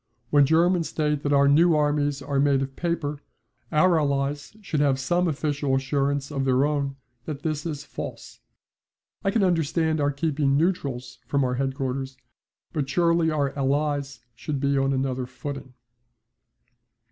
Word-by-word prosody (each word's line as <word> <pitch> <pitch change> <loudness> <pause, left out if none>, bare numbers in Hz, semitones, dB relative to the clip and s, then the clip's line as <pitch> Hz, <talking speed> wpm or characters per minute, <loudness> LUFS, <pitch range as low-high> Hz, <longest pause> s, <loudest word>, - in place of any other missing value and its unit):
When 145 -2 +5
Germans 170 +2 +3
state 150 -2 0
that 145 - -1
our 140 0 +5
new 160 +4 +5
armies 145 -2 +1
are 140 -1 -1
made 140 -1 +3
of 135 0 -7
paper, 165 -4 -2 0.5
our 165 +2 +4
Allies 145 +5 -2
should 170 -7 -3
have 140 -2 +2
some 175 +7 +1
official 145 -3 0
assurance 140 +1 -1
of 135 -2 -1
their 130 +1 +3
own 140 -2 -1 0.3
that 150 -2 -6
this 155 0 -2
is 150 -2 -5
false. - - -8 0.8
I 195 - +2
can 205 +1 +2
understand 160 -2 +1
our 145 - +2
keeping 140 -1 0
neutrals 135 -7 -1
from 140 -1 +1
our 125 -1 0
headquarters, 135 0 -3 0.6
but 145 -5 -2
surely 170 +1 +2
our 145 -3 0
Allies 140 -1 -1
should 145 +4 -4
be 140 0 +1
on 135 0 +2
another 130 -1 -1
footing. 130 0 -7
145 Hz, 150 wpm, -25 LUFS, 135-155 Hz, 0.8 s, When